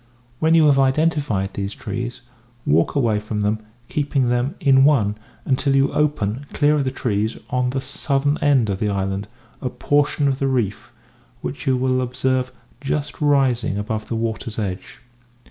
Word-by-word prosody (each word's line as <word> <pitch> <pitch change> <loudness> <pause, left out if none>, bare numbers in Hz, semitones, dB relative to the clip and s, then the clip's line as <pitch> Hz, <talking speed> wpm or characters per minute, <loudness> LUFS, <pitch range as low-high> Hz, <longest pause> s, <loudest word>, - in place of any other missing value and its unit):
When 160 +1 +4
you 160 -2 +6
have 140 -2 +5
identified 135 -8 +1
these 100 0 -4
trees, 120 +5 -5 0.4
walk 80 - +2
away 115 -7 +2
from 105 0 -3
them, 105 +1 0 0.3
keeping 140 -4 0
them 125 +7 0
in 135 -5 +5
one, 130 -8 +4 0.3
until 135 +1 +1
you 135 0 +3
open, 140 -3 0
clear 145 0 +3
of 140 - 0
the - - +1
trees 110 -4 -1
on 125 0 +1
the 135 +1 -2
southern 140 +2 -1
end 135 -8 +3
of 95 - -3
the 105 - 0
island, 95 0 -2 0.3
a 130 - -1
portion 145 +2 +1
of 135 -1 0
the 135 - +1
reef 120 -4 -1 0.5
which 140 +1 -6
you 130 -1 +3
will 130 0 +1
observe 130 +1 -1 0.3
just 145 +2 -3
rising 135 -7 +2
above 110 +1 -3
the 115 - -3
water's 115 0 -3
edge. 100 +4 -5
130 Hz, 165 wpm, -21 LUFS, 110-140 Hz, 0.5 s, you